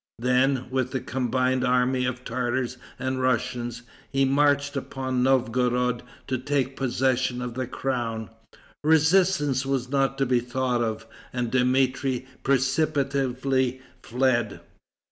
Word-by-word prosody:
Then, 125 +2 +2
with 130 0 -1
a - - +1
combined 130 0 0
army 125 0 +2
of 125 0 -4
Tartars 125 +1 -2 0.2
and 130 0 -2
Russians, 120 -1 -1 0.3
he 135 0 +3
marched 145 +1 +2
upon 130 -2 -2
Novgorod 125 -1 +2 0.2
to 130 -1 -2
take 135 0 -1
possession 130 -1 0
of 125 -1 -4
the 130 0 -3
crown. 115 -4 -3 0.5
Resistance 160 -3 +3
was 135 -2 -1
not 135 -1 +1
to 135 - +2
be 125 -1 +2
thought 125 0 -1
of, 110 -1 -2 0.3
and 120 -2 -2
Dmitri 130 0 +1 0.2
precipitately 135 -2 +1 0.2
fled. 120 -3 0
130 Hz, 120 wpm, -25 LUFS, 125-135 Hz, 0.5 s, he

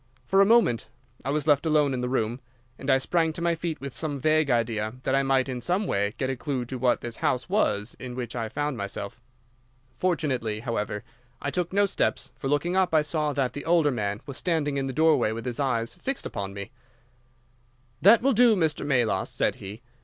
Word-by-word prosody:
For 195 +1 +4
a 195 - +5
moment 225 - +3 0.4
I - - -3
was 145 0 0
left 145 -3 +4
alone 150 -3 +2
in 125 - -2
the 125 - -2
room, 120 -1 -1 0.4
and 135 - -5
I 135 - +6
sprang 160 +4 +1
to 170 - -5
my 170 0 +2
feet 165 -1 -4
with 140 -1 -6
some 145 +1 -3
vague 155 +1 +2
idea 115 -2 0
that 130 - 0
I 135 - +4
might 135 -1 +2
in 125 -2 -4
some 180 - 0
way 100 - -1
get 130 - -1
a 135 - -1
clue 130 -1 -3
to 130 +1 -6
what 125 0 +2
this 120 -1 -5
house 125 0 0
was 120 - 0
in 125 -1 -7
which 125 -2 -5
I 115 -2 -3
found 145 +1 -2
myself. 100 +2 -5 0.7
Fortunately, 130 -12 -1
however, 105 -3 -3 0.4
I 140 - -3
took 180 +1 -2
no 200 +1 +3
steps, 195 - -1
for 135 - -5
looking 145 +6 0
up 185 -3 +2
I 155 - +5
saw 150 0 -1
that 130 -3 0
the 145 - -6
older 165 -3 +3
man 105 -3 -2
was 140 -1 -7
standing 150 -5 0
in 135 -1 -1
the - - -2
doorway 150 -5 +3
with 115 +2 -6
his 125 0 -3
eyes 120 -4 0
fixed 260 +9 -4
upon 100 -1 -4
me. 100 -1 -6 1.3
"'That 225 +5 +7
will 275 0 +4
do, 235 0 +5
Mr. 160 -5 0
Melas,' 125 -9 +1
said - - 0
he. 105 +5 -9
135 Hz, 215 wpm, -26 LUFS, 120-160 Hz, 1.3 s, That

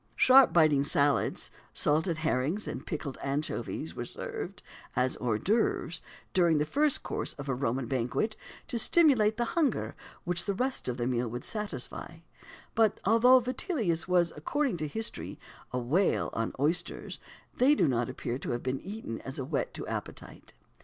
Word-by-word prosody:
"Sharp 265 0 +7
biting 155 -4 +4
salads," 140 0 +1 0.2
salted 160 +3 +2
herrings, 160 +5 -1
and - - -6
pickled 145 -5 -4
anchovies, 140 +3 -3
were - - -3
served, - - -6 0.3
as 125 0 +1
hors 115 -4 0
d'oeuvres 185 - 0 0.3
during 170 -4 +4
the 150 - +1
first 290 - +2
course - - -2
of 140 -1 -8
a 135 - 0
Roman 125 0 -1
banquet, 130 - -1 0.3
to 235 - +1
stimulate 230 -8 +4
the 240 - +1
hunger 320 -5 +1 0.3
which 175 +1 0
the 200 - -1
rest 260 +5 -1
of 125 -1 -2
the 120 - -1
meal 125 -1 0
would 120 +2 -5
satisfy; 170 - -4 0.5
but 225 -2 +3
although 235 +5 +6
Vitellius 240 - -1
was, 175 -2 +2
according 260 - -1
to 155 -1 -3
history, 220 +9 -3 0.3
"a 125 - -2
whale 150 +11 +1
on" 115 0 -1
oysters, 155 +5 -1 0.4
they 270 +4 +5
do 175 - +3
not 120 -3 0
appear 120 +2 -4
to - - -6
have 120 - -2
been 130 +1 -2
eaten 195 - -6
as 135 +3 -7
a 135 - -3
whet 145 +1 -2
to - - -5
appetite. - - -7
165 Hz, 165 wpm, -30 LUFS, 135-220 Hz, 0.5 s, Sharp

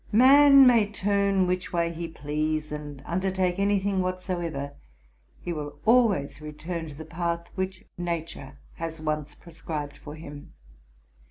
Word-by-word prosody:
Man 275 +4 +8
may 230 -5 +5
turn 200 -1 +1
which 180 0 -2
way 170 -1 0
he 170 +1 -5
please, 155 0 -2
and 145 -2 -7
undertake 185 0 0
any 200 +1 +3
thing 195 -1 0
whatsoever, 175 -6 -3 0.7
he 175 - -4
will 145 -2 -6
always 220 - +3
return 160 +2 -5
to 150 - -9
the 160 +2 -8
path 170 +1 -3
which 190 -1 -4
nature 165 -5 -4 0.2
has 165 -1 -5
once 150 -1 -3
prescribed 155 -3 -6
for 150 0 -9
him. 145 -2 -10
170 Hz, 140 wpm, -26 LUFS, 150-190 Hz, 0.7 s, Man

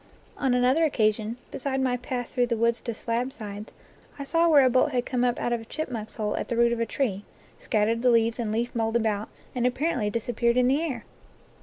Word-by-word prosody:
On 265 -3 +1
another 255 +6 +3
occasion, 220 -5 +1
beside 270 0 -2
my 255 -2 +1
path 245 0 -4
through 245 -1 +1
the 235 -1 -1
woods 235 +1 +1
to 235 - -3
Slabsides, 225 -3 -4 0.5
I 280 - -5
saw 335 +4 +2
where 285 -4 +6
a - - +5
bolt 255 +3 +3
had 245 -1 0
come 250 -2 -1
up 245 -1 +1
out 240 - 0
of 235 - -1
a - - -11
chipmunk's 235 -6 -5
hole 210 -2 -2
at - - -3
the 235 - -2
root 235 0 +4
of 235 - -3
a 230 - 0
tree, 205 -6 -1 0.4
scat 210 -3 +1
tered 230 +1 0
the 250 - +4
leaves 230 0 +3
and 225 -3 -1
leaf 235 +3 -1
mould 225 -1 -1
about, 220 -2 0 0.2
and 245 - -1
appar 270 +7 +1
ently 210 -4 -1
disappeared 235 +2 0
in 250 0 +4
the 275 +4 +2
air. 265 -9 -3
240 Hz, 230 wpm, -26 LUFS, 225-255 Hz, 0.5 s, where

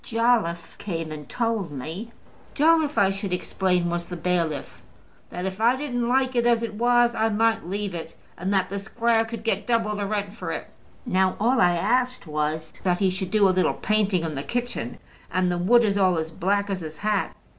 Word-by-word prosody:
"Jolliffe 225 -8 0
came 165 -5 -4
and 150 -2 -8
told 225 -6 -1
me" 160 - -6 0.4
Jolliffe, 310 0 +3
I 195 -1 +4
should 195 0 -4
explain, 180 -1 0
was 170 0 -2
the 175 0 -7
bailiff, 170 -3 -2 0.5
"that 180 +1 -5
if 190 +2 -4
I 235 +3 +5
didn't 245 -4 -2
like 260 0 +2
it 240 0 +3
as 235 -1 +3
it 230 - -3
was, 240 +2 +3
I 225 -1 +1
might 225 -1 +1
leave 200 0 -3
it, 165 -1 -7 0.2
and 185 +3 -3
that 190 -2 +1
the 200 - -2
squire 225 +2 +1
could 225 -1 -7
get 225 - -1
double 225 -3 +1
the 205 -1 -2
rent 205 -1 -2
for 225 - -5
it. - - -6 0.3
Now 190 -4 +2
all 240 +5 +3
I 175 -1 +5
asked 250 +8 0
was 155 +1 -2
that 180 -2 +1
he 190 -1 +2
should 190 0 -4
do 210 -2 +4
a - - +4
little 185 0 +2
painting 205 -5 +1
in 160 -2 -3
the 135 - -3
kitchen; 245 - -3 0.3
and 185 -1 +1
the 175 - -1
wood 235 +7 +5
is 205 -2 +1
all 185 -3 +3
as 160 0 -3
black 200 +4 0
as 190 -2 -2
his 155 -1 -7
hat." 210 -1 -1
200 Hz, 210 wpm, -25 LUFS, 180-230 Hz, 0.5 s, I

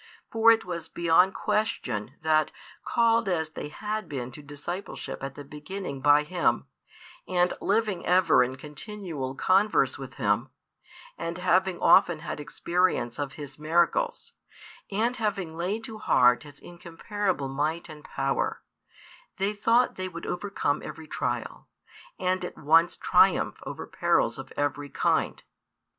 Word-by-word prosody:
For 225 0 +5
it 225 - +2
was 170 -3 -5
beyond 170 +3 +3
question, 140 - -1
that, 155 -1 +3 0.3
called 230 -2 +2
as 160 -3 0
they - - -6
had 215 +7 -4
been 130 -4 -4
to 150 - -11
discipleship 145 +7 -6
at 135 0 -5
the 145 - -8
beginning 150 0 -7
by 145 +1 +5
Him, 175 +4 0 0.6
and 180 -1 +2
living 210 -2 0
ever 180 -6 +4
in 130 +1 -3
continual 150 - -6
converse 195 +9 +2
with - - -8
Him, - - 0 0.7
and 170 +1 -3
having 185 0 +2
often 165 -3 +5
had 170 - -5
experience 170 -4 0
of 140 -2 -3
His 145 -1 -9
miracles, 175 - +1 0.6
and 225 +5 0
having 195 -7 -2
laid 190 +7 -2
to 225 -4 -7
heart 125 -9 +4
His 145 -2 -13
incomparable 175 -1 -3
might 150 +5 -2
and 155 -2 -11
power, 135 0 -2 0.7
they 195 +2 0
thought 230 +4 +2
they 185 0 -3
would 170 -1 -8
overcome 180 -5 -1
every 160 - -8
trial, - - -3 0.5
|439 - - -5
and 185 -1 -1
at - - -8
once 165 +3 +4
triumph - - +3
over - - -6
perils - - +1
of - - -9
every 145 0 -1
kind. - - 0
170 Hz, 140 wpm, -27 LUFS, 145-195 Hz, 0.7 s, For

